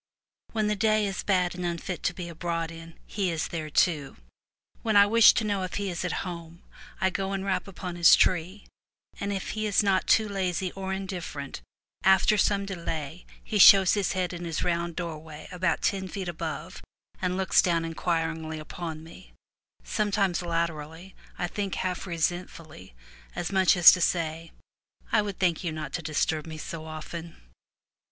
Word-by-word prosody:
When 215 -1 0
the 210 0 +1
day 215 0 +2
is 195 -1 -3
bad 180 -3 +1
and 180 0 -6
unfit 175 +1 -3
to 180 - +1
be 180 -2 -6
abroad 165 0 -3
in, 165 0 -11
he 195 -3 -2
is 165 -2 -2
there 155 -2 -4
too. 150 -3 +1 0.6
When 220 -2 0
I 200 - +8
wish 225 +2 +7
to 230 - +1
know 205 -2 -1
if 185 - -4
he 200 -2 -2
is 175 - -4
at 180 +2 -2
home, 170 -1 -8 0.4
I 190 0 +2
go 195 +1 -2
and 195 0 -3
rap 195 0 -1
upon 180 -2 -7
his 170 -1 +8
tree, 185 +3 +1 0.5
and, 200 0 -2
if 195 -2 -3
he 215 0 -2
is 210 +1 +3
not 195 -2 +1
too 220 -1 +4
lazy 185 -2 -2
or 190 0 -5
indifferent, 185 -7 -5 0.4
after 190 +2 +5
some 200 0 +2
delay 170 -4 -5 0.2
he 210 - -2
shows 190 -1 +8
his 200 -3 0
head 185 -1 -1
in 175 0 -6
his 165 -2 -4
260 - - -1
FROM 180 - +2 0.2
THE 170 - -12
TOWER 170 -3 -4
WINDOW 155 -2 -10
round - - -12
doorway - - -7
about 180 -2 0
ten 190 -1 0
feet 190 0 -5
above, 160 -3 -5 0.4
and 180 0 -1
looks 190 -1 +4
down 170 -2 +1
inquiringly 165 -1 -2
upon 160 0 -7
me 165 - -14 0.3
— - - -68 0.2
sometimes 200 -4 0
latterly 165 +1 -3 0.2
I 175 - -1
think 200 +2 -3
half 185 +1 -3
resentfully, 165 - -4 0.4
as 175 - -3
much 190 -1 +4
as 175 - +10
to 180 - 0
say, 165 -1 -1 0.3
" - - -31
I 220 - +4
would 205 -2 -5
thank 175 -3 +1
you 170 - -2
not 155 -3 -6
to 175 - -2
disturb 155 0 -1
me 160 -1 -7
so 155 +1 -7
often." 160 +1 -7
180 Hz, 190 wpm, -27 LUFS, 165-195 Hz, 0.6 s, as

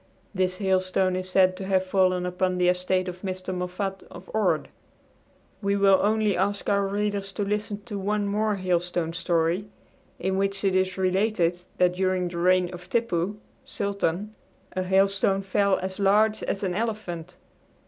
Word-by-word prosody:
This 185 -1 0
hailstone 185 -1 +1
is 185 0 -3
said 185 0 +4
to 190 - -5
have 190 -1 +2
fallen 185 -1 +2
upon 180 0 0
the 180 0 +2
estate 185 +1 +1
of 180 0 -6
Mr. 185 -1 -4
Moffat 185 +2 -3
of 175 +1 -12
Ord. 220 -1 +1 0.9
We 200 -1 +1
will 195 -1 +5
only 215 -1 +2
ask 200 +2 -1
our 200 -1 +2
readers 200 0 -2
to 205 - -2
listen 210 0 -3
to 205 -3 -5
one 205 +1 0
more 210 +1 +1
hailstone 175 -3 -1
story, 170 +3 0 0.5
in 190 +1 -1
which 195 0 -1
it 195 -1 +2
is 185 0 +1
related 185 -2 +1 0.2
that 180 -1 +3
during 185 -1 +1
the 170 -1 -5
reign 180 0 +3
of 180 0 -10
Tippoo, 205 -4 0 0.3
sultan, 200 0 -2 0.4
a 185 - -1
hailstone 195 +1 +2
fell 200 0 +2
as 190 +1 -4
large 210 +2 +3
as 200 - -3
an 185 -2 0
elephant. 190 -5 -4
190 Hz, 160 wpm, -26 LUFS, 180-200 Hz, 0.9 s, will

